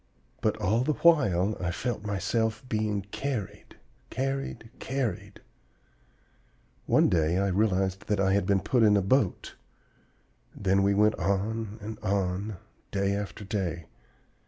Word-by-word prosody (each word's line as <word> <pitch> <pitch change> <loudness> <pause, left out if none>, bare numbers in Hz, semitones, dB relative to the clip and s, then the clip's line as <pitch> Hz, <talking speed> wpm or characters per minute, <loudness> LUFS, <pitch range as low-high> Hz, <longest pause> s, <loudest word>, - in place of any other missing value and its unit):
But 110 0 +1
all 105 +2 +1
the 155 - +1
while 110 - +3
I 90 - -1
felt 115 +4 -3
myself 110 +4 -1
being 105 -3 -1
carried, 105 -7 -4 0.3
carried, 135 -4 -3
carried! 135 -4 -3 1.5
One - - +4
day 80 0 +2
I 100 +1 +1
realized 95 -1 0
that 105 -1 0
I 95 0 +3
had 100 -2 +1
been 100 -2 +3
put 125 +5 +1
in 105 -2 +5
a - - +3
boat; 105 -1 +1 1.0
then 95 -1 +2
we 100 0 +3
went 105 +1 +4
on 105 +3 -1
and 110 +2 -7
on, 100 0 -1 0.3
day 100 0 0
after 100 +1 -4
day. 90 -6 -3
105 Hz, 135 wpm, -28 LUFS, 95-110 Hz, 1.5 s, in